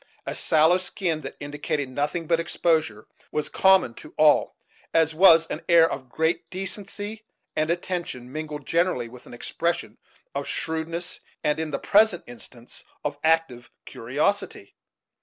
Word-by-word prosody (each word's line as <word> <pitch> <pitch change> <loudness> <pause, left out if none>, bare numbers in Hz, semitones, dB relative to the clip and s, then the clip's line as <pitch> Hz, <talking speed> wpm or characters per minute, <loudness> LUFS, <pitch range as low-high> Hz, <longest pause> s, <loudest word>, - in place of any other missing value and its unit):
A - - -3
sallow 160 +3 +4
skin, 180 -3 -2
that 135 - -7
indicated 145 0 -3
nothing 145 +6 -2
but 165 +1 +2
exposure, 165 -1 0 0.3
was 150 - -2
common 190 -10 +4
to 150 - -14
all, 155 -1 +4 0.4
as 160 -1 +4
was 165 -1 +7
an - - -5
air 165 -1 +7
of 130 -5 -6
great 160 +5 -1
decency 205 +3 -5 0.3
and 155 +1 0
attention, 170 -8 -3
mingled, 150 -1 -6
generally, 165 -8 +1
with 125 +1 -14
an - - -12
expression 170 +7 -3 0.3
of - - -3
shrewdness, 165 +2 -3 0.2
and 150 +1 +1
in 160 -1 -2
the 150 - -2
present 210 -3 +3
instance 120 0 -10 0.2
of 145 -1 -3
active 160 -7 +1 0.2
curiosity. - - -2
160 Hz, 140 wpm, -25 LUFS, 145-175 Hz, 0.4 s, was